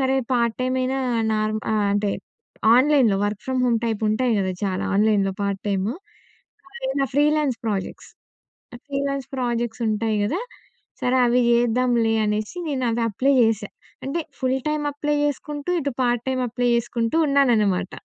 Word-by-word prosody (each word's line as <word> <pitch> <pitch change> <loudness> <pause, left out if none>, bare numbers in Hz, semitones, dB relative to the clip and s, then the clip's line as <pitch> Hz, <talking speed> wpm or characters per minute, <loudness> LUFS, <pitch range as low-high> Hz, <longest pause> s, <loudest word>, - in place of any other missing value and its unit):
సరే, 265 0 +2 0.2
part 235 -2 +1
time 255 0 0
అయినా 265 +1 -1 0.4
నార్మ 215 0 0
ఆహ్, 210 -1 +1
అంటే 205 0 0 0.7
ఆన్‍లైన్‍లో 260 -7 +4
వర్క్ 205 -1 -4
ఫ్రమ్ 260 -1 0
హోమ్ 235 -2 +2
టైప్ 225 -2 -2
ఉంటాయి 235 +3 +1
గదా 190 -1 0
చాలా 190 0 -1
ఆన్‍లైన్‍లో 205 -2 +2
part 200 -1 -2
టైము.అవి 265 - -7
ఎవైన 275 0 0
freelance 295 -3 +2
projects. 205 -4 -4 0.8
Freelance 275 -1 -2
projects 240 -1 -2
ఉంటాయి 215 0 0
గదా! 310 - -1 0.6
సరే 250 +1 +1
అవి 245 +1 +3
జేద్దాంలే 235 -1 +2
అనేసి 210 +10 -2
నేనవి 250 -5 -1
అప్లై 270 +7 +1
చేశా. 220 -2 +1 0.4
అంటే 280 +5 -2 0.2
ఫుల్ 260 0 +1
టైమ్ 300 -1 -1
అప్లై 295 +1 -1
చేసుకుంటూ, 290 +2 -3
ఇటు 280 0 -2
పార్ట్ 240 -1 +1
టైమ్ 260 -1 0
అప్లై 245 +1 -1
చేసుకుంటూ 235 +3 -1
ఉన్నాననమాట. 225 -10 +2
240 Hz, 145 wpm, -23 LUFS, 215-275 Hz, 0.8 s, ఆన్‍లైన్‍లో